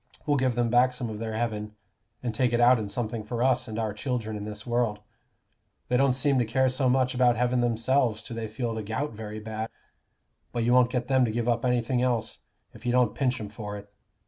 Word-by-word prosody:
We'll 145 -1 +2
give 130 -2 +1
them 120 -1 +1
back 125 +1 +4
some 125 -3 -4
of 105 - -6
their 110 -1 -4
heaven, 105 -2 -3 0.5
and 120 -3 -2
take 120 +1 +1
it 120 - +2
out 120 0 +6
in 105 -2 -4
something 110 +1 -3
for 120 +2 -2
us 130 -1 +2
and 110 -1 -5
our 110 -2 -1
children 115 -2 -3
in 105 0 -5
this 105 0 -6
world. 120 -3 0 0.9
They 125 - +3
don't 135 0 +4
seem 135 +1 +2
to - - +3
care 130 +4 +2
so 130 0 +1
much 130 0 +2
about 125 -1 +4
heaven 125 +1 +2
themselves 120 0 +1
till 115 - -8
they 115 -1 -3
feel 115 +2 -3
the 110 - -3
gout 115 +8 -3
very 110 0 -7
bad; 110 +1 -5 0.8
but 120 - 0
you 120 +1 +3
won't 125 -1 +5
get 125 -1 -1
them 130 -1 +3
to - - -1
give 120 +1 -2
up 120 -1 +1
anything 125 0 +1
else, 120 -3 0 0.3
if - - -14
you 120 - 0
don't 125 -3 +3
pinch 130 -3 0
'em 105 -2 -6
for 105 -1 -6
it. 100 0 -13
120 Hz, 235 wpm, -27 LUFS, 110-125 Hz, 0.9 s, out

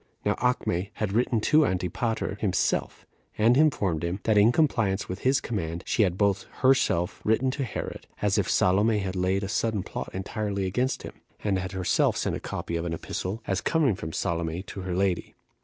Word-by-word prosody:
Now - - +3
Acme 100 -7 0
had 105 -3 -2
written 120 0 +2
to 155 +7 +4
Antipater 100 - -1
himself, 95 -5 0 0.3
and 115 +3 +5
informed 100 - +2
him, 85 +3 -2
that, 110 - +2
in 105 +3 +6
compliance 110 -9 +1
with 95 +2 -5
his 135 +2 +3
command, 85 -6 -4
she - - +1
had 90 -3 +2
both 100 -1 +1
herself 130 -10 +2
written 115 +4 +2
to 135 +1 -3
Herod, 125 - -5
as 105 0 +2
if 95 - 0
Salome 105 +4 +3
had 95 -2 -3
laid 95 +2 +1
a - - -2
sudden 110 -1 0
plot - - -5
entirely 100 +1 -3
against 125 +8 -1
him, - - -7 0.3
and 100 -3 +1
had 95 +1 -5
herself 95 -1 +2
sent - - -1
a - - -4
copy 85 - -4
of 85 - -3
an 85 -1 -2
epistle, 95 +6 -4
as 95 +2 -1
coming 155 -8 +2
from 80 -4 -6
Salome 85 +2 -2
to 100 - -8
her 90 -1 -3
lady. 95 -1 0
100 Hz, 190 wpm, -27 LUFS, 90-115 Hz, 0.3 s, in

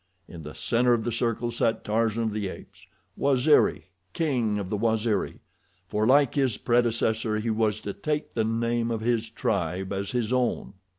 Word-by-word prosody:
In 85 - -10
the 75 0 -9
center 120 +1 +2
of 115 -2 0
the 120 - -2
circle 115 0 -1
sat 115 -1 0
Tarzan 115 +1 0
of 110 -2 -1
the 105 -2 -2
Apes—Waziri, 135 - 0 0.3
king 125 -10 0
of 100 -2 -4
the - - +1
Waziri, 110 0 0 0.5
for, 105 +3 0
like 140 0 +4
his 130 -6 +1
predecessor, 115 -2 +1
he 110 +1 -1
was 110 -1 +1
to 100 - -5
take 150 +5 -3
the 115 - +1
name 115 +1 0
of 115 -2 -2
his 115 -1 0
tribe 95 +2 -2
as 100 0 -3
his 120 -2 -1
own. 125 -5 0
115 Hz, 170 wpm, -26 LUFS, 110-120 Hz, 0.5 s, like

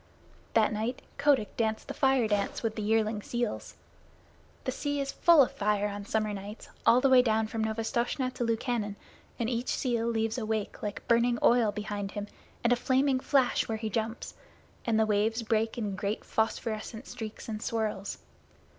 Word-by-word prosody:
That 220 -1 +4
night 225 +4 -3 0.2
Kotick 280 -7 +2
danced 220 -1 -1
the - - -4
Fire 265 -4 +3
dance 205 +1 -1
with 220 -1 -1
the 215 - -3
yearling 215 0 +1
seals. 240 0 -3 0.9
The - - -1
sea 290 -1 -2
is 275 0 -2
full 335 -4 +6
of - - -2
fire 210 0 0
on 205 0 -6
summer 215 -1 0
nights 205 +2 -8 0.2
all 245 +2 +7
the 270 - +4
way 255 -1 +8
down 220 -2 +2
from 220 0 -3
Novastoshnah 235 +4 -1
to 245 - -2
Lukannon, 230 -2 -1 0.4
and 230 - -1
each 240 0 -2
seal 235 -3 0
leaves 225 0 0
a 225 - -3
wake 220 -2 -2
like 205 -1 -5
burning 235 +1 +3
oil 235 -3 +5
behind 205 -1 -4
him 205 0 -3 0.4
and 240 +1 +4
a - - +1
flaming 260 +1 +2
flash 265 -1 +2
when 225 - -2
he 220 0 -4
jumps, 225 +1 -3 0.5
and 225 -2 +2
the 220 - +4
waves 215 +2 +1
break 225 +1 0
in 210 -4 -2
great 200 +3 -3
phosphorescent 220 +1 -2
streaks 220 -2 -7
and 215 -2 -4
swirls. 215 -4 -2
225 Hz, 180 wpm, -29 LUFS, 215-240 Hz, 0.9 s, way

